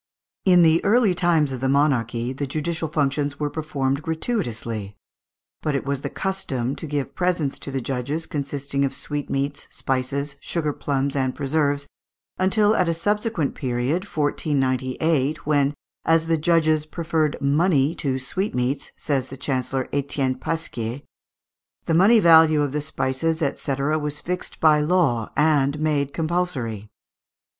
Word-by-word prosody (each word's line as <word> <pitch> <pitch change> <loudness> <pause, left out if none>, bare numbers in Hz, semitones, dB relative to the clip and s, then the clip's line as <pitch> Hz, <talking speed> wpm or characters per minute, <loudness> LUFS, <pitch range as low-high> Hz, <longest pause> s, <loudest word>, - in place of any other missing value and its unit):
In 180 -2 +6
the 165 0 +4
early 215 -1 +4
times 170 -5 +2
of 130 -2 -5
monarchy, 130 -3 +1
the 140 +1 -3
judicial 160 +3 -2
functions 145 -1 -1
were 145 -1 -1
performed 140 -3 -1
gratuitously; 120 - -3 0.6
but 150 -2 -1
it 135 - -2
was 140 -1 -2
the - - -3
custom 135 -10 -2
to 160 - -6
give 145 -2 -3
presents 175 -6 0
to - - -6
the 135 -1 -2
judges, 135 +6 -3
consisting 140 -1 -2
of 135 - -1
sweetmeats, 145 -1 -3
spices, 135 +2 -2
sugar 150 -1 -1
plums, 140 -1 -1
and 130 -2 0
preserves, 145 0 0 0.5
until 205 +3 +3
at 185 -5 +2
a 165 - +1
subsequent 205 -2 -1
period, 130 +7 -1
1498, 145 -2 0
when, 145 -1 +2 0.3
as 165 0 +3
the 165 0 +2
judges 155 -1 +2
"preferred 160 -2 -1
money 145 +1 +2
to 135 -6 -1
sweetmeats," 130 -2 -2
says 135 -3 -1
the 135 - -8
Chancellor 130 -1 -2
Etienne 140 -2 0
Pasquier, 130 -5 -3 0.8
the 165 - 0
money 200 +8 +6
value 160 -4 +6
of 145 - -1
the 150 +1 -1
spices, 145 +2 -1 0.2
&c., 140 - -2
was 150 +1 -1
fixed 180 +1 -5
by 155 -1 +5
law 150 -8 +1
and 150 -1 +3
made 145 -3 0
compulsory. 145 - -2
145 Hz, 140 wpm, -23 LUFS, 135-160 Hz, 0.8 s, In